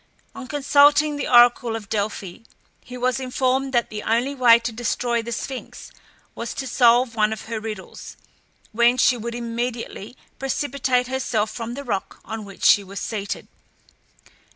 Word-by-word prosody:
On 260 - -9
consulting 290 +1 +4
the - - -3
oracle 240 -1 +5
of 220 -2 -7
Delphi, 205 -4 -3 0.5
he 250 0 -9
was 255 +1 0
informed 260 +1 0
that 240 -2 +1
the 210 -1 -5
only 240 +6 0
way 245 -4 +6
to 235 0 -4
destroy 235 +1 -1
the 235 +1 -7
Sphinx 260 +3 -6 0.4
was - - -6
to 270 - -4
solve 245 -2 +3
one 215 -1 +2
of 220 - -5
her 225 -1 -4
riddles, 215 -3 -8 0.5
when 235 +3 +3
she 255 - +4
would 235 0 -5
immediately 235 -1 -5 0.2
precipitate 270 -2 0
herself 245 -4 -1
from 235 0 -6
the 280 - -6
rock 205 -7 -4
on 220 -1 -6
which 195 -1 -12
she 205 - +6
was 195 +1 -8
seated. 205 -3 -5
240 Hz, 155 wpm, -22 LUFS, 220-255 Hz, 0.5 s, way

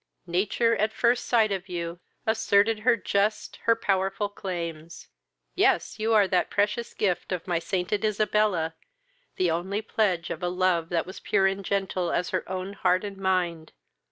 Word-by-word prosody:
Nature, 200 +6 +1
at 215 +1 +1
first 235 +2 +1
sight 220 -3 +3
of 190 -1 -3
you, 170 -1 -4 0.3
asserted 215 0 +3
her 235 +2 +3
just, 205 +1 -1
her 230 - +5
powerful 195 -1 0
claims: 170 -5 -6 0.4
yes, - - +2
you 220 +1 0
are 210 -3 +5
the 185 -1 +2
precious 210 +3 -1
gift 190 -3 -1
of 180 -3 -3
my 175 -2 0
sainted 190 +4 -2
Isabella, 210 -5 +1 0.6
the 180 -2 +1
only 190 +6 -2
pledge 190 -7 0
of - - -5
a 180 - 0
love 180 -2 +1
that 170 -2 0
was 185 - -9
pure 195 - +2
and 195 +1 0
gentle 190 -3 -1
as 180 - -1
her - - -2
own 190 +1 -4
heart 185 -1 +1
and 200 -1 -6
mind! 180 -4 -1
195 Hz, 165 wpm, -26 LUFS, 180-210 Hz, 0.6 s, her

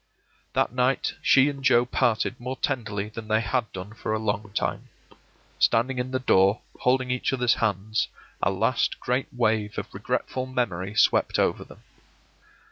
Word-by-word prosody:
That - - +1
night 125 +1 +1
she 135 0 +5
and 140 -2 -4
Joe 125 -3 +5
parted 120 -1 0
more 125 +2 -4
tenderly 105 -6 -2
than 110 0 -8
they 110 +1 +2
had 115 +2 -1
done 95 +3 -8
for 110 - -3
a - - +1
long 105 -1 -2
time. - - -2 0.7
Standing 125 +3 +2
in 125 +1 -2
the 130 - -1
door, 100 -5 +3 0.2
holding 130 0 +1
each 125 - 0
other's 125 -2 +2
hands, 110 0 0 0.3
a - - +3
last 110 +6 0
great 125 +2 -1
wave 110 -3 0
of - - -5
regretful 130 0 -2
memory 105 -6 -2
swept - - +3
over - - +1
them. - - -16
115 Hz, 160 wpm, -25 LUFS, 105-125 Hz, 0.7 s, she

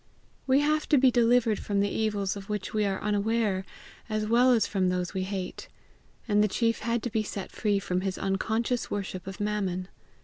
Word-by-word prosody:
We 270 +2 +4
have 305 +1 +1
to 295 - +5
be 260 -1 +5
delivered 235 -2 +3
from 200 -1 -1
the 200 0 +1
evils 210 -3 -1
of 200 0 -9
which 210 -2 -3
we 215 -1 +1
are 195 -1 -1
unaware 210 -1 +1 0.5
as 215 0 -1
well 240 +4 +4
as 235 -3 +4
from 190 -3 0
those 180 -1 -2
we 190 - -1
hate; 185 -1 -4 0.6
and 210 -1 +3
the - - +3
chief 230 +2 0
had 230 +1 -1
to 240 - -3
be 220 -1 +1
set 205 -2 -6
free 210 -2 0
from 180 -2 -1
his 190 -1 -2
unconscious 220 +5 -1
worship 190 -3 -4
of 195 - -7
Mammon. 195 -3 -2
210 Hz, 200 wpm, -28 LUFS, 195-230 Hz, 0.6 s, to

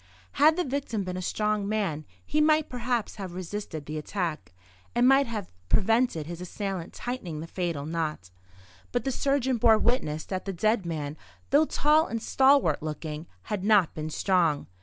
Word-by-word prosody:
Had 310 +2 +5
the 360 - 0
victim 260 - -2
been 180 -1 -4
a 185 - -3
strong 210 +1 -1
man 190 -9 -1 0.2
he 305 - +1
might 310 0 +3
perhaps 245 -3 -2
have 190 -4 -6
resisted 180 -4 -5
the 155 +2 -4
attack, 155 - -3 0.4
and 240 +1 +4
might 270 0 +5
have 215 - -5 0.2
prevented 225 -6 +2
his 170 +2 -7
assailant 185 -1 -4
tightening 195 -11 -5
the 160 - -5
fatal 165 -4 -3
knot; 155 - -3 0.6
but 245 - 0
the 270 - -1
surgeon 265 -1 +1
bore 225 -1 +6
witness 185 -11 0
that 185 -1 -4
the 195 - -3
dead 210 +1 +1
man, 150 -2 -4 0.3
though 295 +3 +6
tall 305 +1 +3
and 230 -1 -4
stalwart 265 - +4
looking, 155 +1 -5 0.2
had 200 - -3
not 205 -5 +4
been 155 0 -4
strong. 170 -3 +1
200 Hz, 170 wpm, -27 LUFS, 165-245 Hz, 0.6 s, bore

